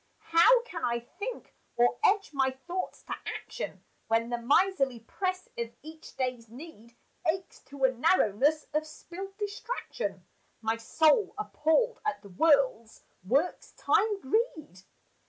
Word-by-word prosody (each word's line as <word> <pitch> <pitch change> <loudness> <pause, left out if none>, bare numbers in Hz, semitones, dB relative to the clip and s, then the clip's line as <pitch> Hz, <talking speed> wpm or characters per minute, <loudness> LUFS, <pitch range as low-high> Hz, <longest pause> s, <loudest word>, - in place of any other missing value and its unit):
How 470 +9 +7
can 360 -9 -7
I 235 -4 +1
think, 425 - -7 0.2
or 240 0 +3
edge 400 -2 +3
my 265 -1 +2
thoughts 345 +8 -5
to - - -5
action, - - -6 0.2
When 230 +1 +1
the 240 - -1
miserly 275 -1 +2
press 370 - -3
of 235 0 -4
each 315 +1 -12
day's 250 -3 -2
need 235 -3 -12 0.3
Aches 365 +3 -2
to 275 -1 -8
a 260 - +6
narrowness 285 - +2
of 310 +1 0
spilled 385 +5 -9
distraction 430 +4 -4 0.3
My 225 0 -1
soul 310 - +3
appalled 425 +5 +1
at 425 - -1
the 200 - -12
world's 255 - +2 0.2
work's 280 - 0
time 420 -1 +2
greed? 310 - -1
305 Hz, 135 wpm, -29 LUFS, 240-380 Hz, 0.3 s, How